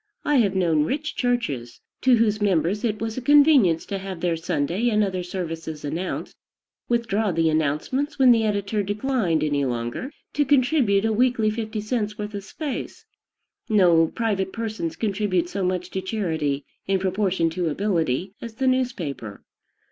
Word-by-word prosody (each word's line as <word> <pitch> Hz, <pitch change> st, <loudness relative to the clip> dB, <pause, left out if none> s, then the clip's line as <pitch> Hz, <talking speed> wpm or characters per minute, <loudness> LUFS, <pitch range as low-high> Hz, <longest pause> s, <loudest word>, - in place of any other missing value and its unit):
I 295 Hz, -1 st, +3 dB
have 200 Hz, -6 st, +2 dB
known 165 Hz, -5 st, +2 dB
rich 295 Hz, -, -3 dB
churches, 150 Hz, -, -2 dB, 0.2 s
to 260 Hz, -1 st, +5 dB
whose 215 Hz, -2 st, +1 dB
members 195 Hz, 0 st, +1 dB
it 215 Hz, -3 st, -1 dB
was 225 Hz, +2 st, -3 dB
a -, -, -9 dB
convenience 280 Hz, -, +5 dB
to 195 Hz, -, -4 dB
have 190 Hz, -2 st, -6 dB
their 170 Hz, -1 st, 0 dB
Sunday 170 Hz, +7 st, -1 dB
and 215 Hz, -2 st, +2 dB
other 185 Hz, -2 st, -2 dB
services 165 Hz, -4 st, -5 dB
announced, 170 Hz, +6 st, -4 dB, 0.5 s
withdraw 225 Hz, -3 st, +1 dB
the 165 Hz, -1 st, +2 dB
announcements 160 Hz, -, -1 dB
when 260 Hz, -2 st, +6 dB
the 225 Hz, -2 st, +4 dB
editor 205 Hz, 0 st, 0 dB
declined 205 Hz, -, 0 dB
any 145 Hz, -2 st, +1 dB
longer 120 Hz, -, -3 dB, 0.2 s
to 290 Hz, -, +2 dB
contribute 255 Hz, -7 st, +3 dB
a 220 Hz, -, +1 dB
weekly 235 Hz, -2 st, +2 dB
fifty 220 Hz, -1 st, -4 dB
cents' 215 Hz, -1 st, -2 dB
worth 210 Hz, -1 st, -5 dB
of 200 Hz, -1 st, -5 dB
space. 310 Hz, -, -6 dB, 0.6 s
No 175 Hz, -6 st, +5 dB
private 195 Hz, -2 st, -1 dB
persons 220 Hz, -7 st, -4 dB
contribute 195 Hz, -5 st, 0 dB
so 195 Hz, 0 st, -3 dB
much 180 Hz, 0 st, -2 dB
to 190 Hz, -, -2 dB
charity, 160 Hz, -9 st, -2 dB, 0.2 s
in 195 Hz, 0 st, +2 dB
proportion 190 Hz, -3 st, 0 dB
to 170 Hz, 0 st, -1 dB
ability, 175 Hz, -1 st, -1 dB
as 230 Hz, -2 st, -7 dB
the 265 Hz, -, -1 dB
newspaper. 185 Hz, -, -2 dB
200 Hz, 160 wpm, -24 LUFS, 165-230 Hz, 0.6 s, when